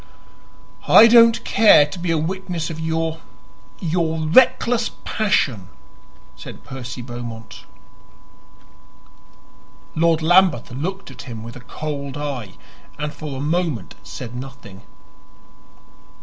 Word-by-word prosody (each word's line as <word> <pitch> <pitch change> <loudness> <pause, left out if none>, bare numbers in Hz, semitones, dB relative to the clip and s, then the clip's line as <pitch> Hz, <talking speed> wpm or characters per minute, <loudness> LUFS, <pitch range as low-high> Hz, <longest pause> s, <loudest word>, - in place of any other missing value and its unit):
"I 225 - +9
don't 230 0 +6
care 210 -9 +6
to 150 +5 -9
be 175 0 -3
a 165 - +2
witness 175 0 -3
of 160 - -7
your 160 0 -2 0.6
your 165 -2 -1
reckless 235 +5 +3 0.2
passion," 130 - 0 0.7
said - - -11
Percy 125 -1 -8
Beaumont. 120 -2 -9 2.3
Lord 165 0 +2
Lambeth 175 -7 +3
looked 185 +10 -5
at - - -11
him 110 -2 -7
with 115 +1 -9
a - - -9
cold 140 0 -6
eye 135 -10 -5 0.4
and 150 0 -4
for 145 -2 -7
a - - -5
moment 150 - -2
said 125 -1 -9
nothing. 125 -6 -10
155 Hz, 110 wpm, -20 LUFS, 125-175 Hz, 2.3 s, I